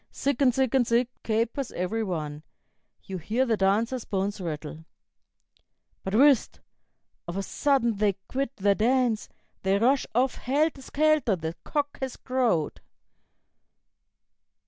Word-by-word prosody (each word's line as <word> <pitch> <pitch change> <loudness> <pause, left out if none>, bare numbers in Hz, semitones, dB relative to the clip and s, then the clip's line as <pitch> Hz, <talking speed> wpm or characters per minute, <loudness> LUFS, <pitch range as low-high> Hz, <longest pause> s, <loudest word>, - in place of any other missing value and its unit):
Zig 280 -1 -1
and 265 -2 +6
Zig 260 -1 0
and 255 -3 +3
Zig, 235 +1 +2
capers 230 +4 -1
every 215 +5 -1
one; 155 -6 -4 0.6
You 190 -1 -6
hear 225 +10 0
the 230 -3 +2
dancers' 220 +5 +1
bones 200 +1 -2
rattle. 160 -1 -6 1.2
"But 190 +2 -2
whist! 275 0 +4 0.7
Of 175 +2 -4
a 195 - -1
sudden 235 -1 +1
they 205 -1 +2
quit 275 0 -2
their 200 -1 +3
dance; 235 +1 +1 0.3
They 190 +1 +2
rush 255 +6 +2
off 255 +2 +2
helter 290 +2 0
skelter, 300 -5 +2
the 160 -1 -4
cock 290 -1 -2
has 265 -2 -4
crowed." 245 - 0
230 Hz, 130 wpm, -27 LUFS, 195-265 Hz, 1.2 s, and